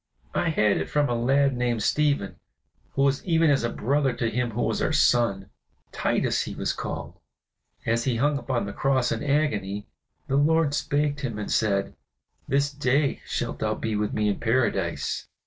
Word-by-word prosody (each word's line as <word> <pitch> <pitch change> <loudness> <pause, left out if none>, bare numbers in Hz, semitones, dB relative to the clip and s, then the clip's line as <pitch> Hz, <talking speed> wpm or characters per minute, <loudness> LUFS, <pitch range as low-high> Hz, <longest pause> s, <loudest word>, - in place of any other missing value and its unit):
"I 175 - +1
had 105 -10 +2
it 80 - -3
from 145 -1 +1
a - - +1
lad 135 +3 +2
named 120 -3 0
Stephen, 145 -9 +1 0.6
who 135 - +1
was 140 0 +1
even 165 -3 +3
as 135 -4 +2
a 120 - 0
brother 135 +3 0
to 115 -1 -1
him 125 +1 0
who 115 +2 -2
was - - -1
our - - +1
son 100 -6 +2 0.4
Titus, - - 0
he - - -6
was - - -1
called. - - -6 0.7
As 115 +1 +1
he 130 -3 +1
hung 140 +4 +1
upon 130 -6 -2
the 100 - -6
cross 130 -2 +1
in - - -2
agony, 105 -9 0 0.4
the 135 - 0
Lord 155 0 +3
spake 145 0 0
to 140 -2 -3
him 115 -3 -6
and 105 - -4
said, 100 -3 +1 0.5
'This 140 +1 +1
day 140 0 +1
shalt - - -3
thou - - 0
be 110 -1 -3
with 105 0 -1
me 105 0 0
in 100 - 0
Paradise. 110 -8 0
130 Hz, 185 wpm, -25 LUFS, 110-145 Hz, 0.7 s, even